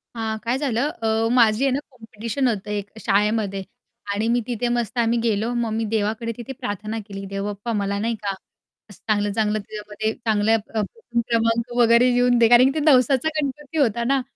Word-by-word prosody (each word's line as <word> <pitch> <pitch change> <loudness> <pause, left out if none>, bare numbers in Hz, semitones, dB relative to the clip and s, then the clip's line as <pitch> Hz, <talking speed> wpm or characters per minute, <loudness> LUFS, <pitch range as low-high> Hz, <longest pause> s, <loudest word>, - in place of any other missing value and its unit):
हां, 220 -1 -2
काय 240 +2 0
झालं 270 -1 0
अ, 225 0 +1
माझी 230 -1 +4
आहे 270 - +2
ना 270 - 0
कॉम्पिटिशन 230 +1 -3
होतं 210 -3 -2
एक 205 -1 -3
शाळेमध्ये 205 -2 0 0.5
आणि 210 +2 -1
मी 240 +1 +2
तिथे 245 0 -1
मस्त 240 -1 -2
आम्ही 235 0 +2
गेलो, 230 +1 0
मग 235 -1 -1
मी 225 +1 -1
देवाकडे 220 +2 -1
तिथे 255 +3 -7
प्रार्थना 210 +2 -4
केली, 195 -1 -7
"देवबाप्पा 200 +3 -4
मला 200 -1 -1
नाही 230 +2 -1
का 200 - -1 0.6
असं 205 - -15
चांगलं, 205 -1 +1
चांगलं 215 0 0
तिच्यामध्ये 210 +1 -4
चांगल्या 220 -1 +1
प 215 - -12
प्रथम 235 - -3
क्रमांक 230 +1 +1
वगैरे 235 +1 +5
येऊन 245 0 +3
दे." 230 - +6
कारण 245 +2 +7
ते - - +1
नवसाचा 270 -1 +4
गणपती 295 +2 -5
होता 235 -5 +2
ना, 270 +2 +2
225 Hz, 185 wpm, -22 LUFS, 210-245 Hz, 0.6 s, कारण